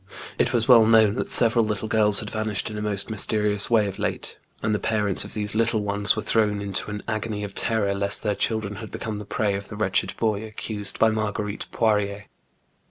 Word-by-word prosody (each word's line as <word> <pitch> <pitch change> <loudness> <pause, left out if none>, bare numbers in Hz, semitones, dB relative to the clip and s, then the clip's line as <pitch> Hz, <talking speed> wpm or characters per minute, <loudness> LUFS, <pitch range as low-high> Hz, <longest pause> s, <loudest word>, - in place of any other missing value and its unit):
It - - +2
was 115 -1 0
well 115 -4 +6
known 110 -2 +5
that - - -4
several 115 0 +6
little 105 0 -3
girls 105 -2 +4
had 105 - -7
vanished 110 -1 -2
in 105 - -7
a - - -5
most 100 0 -2
mysterious 105 -1 +1
way. 115 -3 +3
of 100 - -6
late, - - -4 0.2
and 105 - 0
the 105 - -1
parents 105 -3 +1
of - - -10
these 105 -1 -3
little 110 -1 0
ones 100 0 +2
were 110 - -4
thrown 105 -1 +1
into 100 0 -2
an 105 0 -6
agony 110 -1 -3
of 100 -1 -7
terror 105 -3 0
lest 100 0 +3
their 105 -2 0
children 105 -1 -2
had 110 0 -8
become 110 -2 -6
the 105 - -8
prey 105 0 -1
of 100 0 -5
the 105 - -9
wretched 105 -2 0
boy 110 -2 -1
accused 110 -2 -5
by 110 0 +3
Mar 110 -1 -2
guerite 105 0 -4
Poirier. 105 -2 -1
105 Hz, 220 wpm, -23 LUFS, 100-110 Hz, 0.2 s, well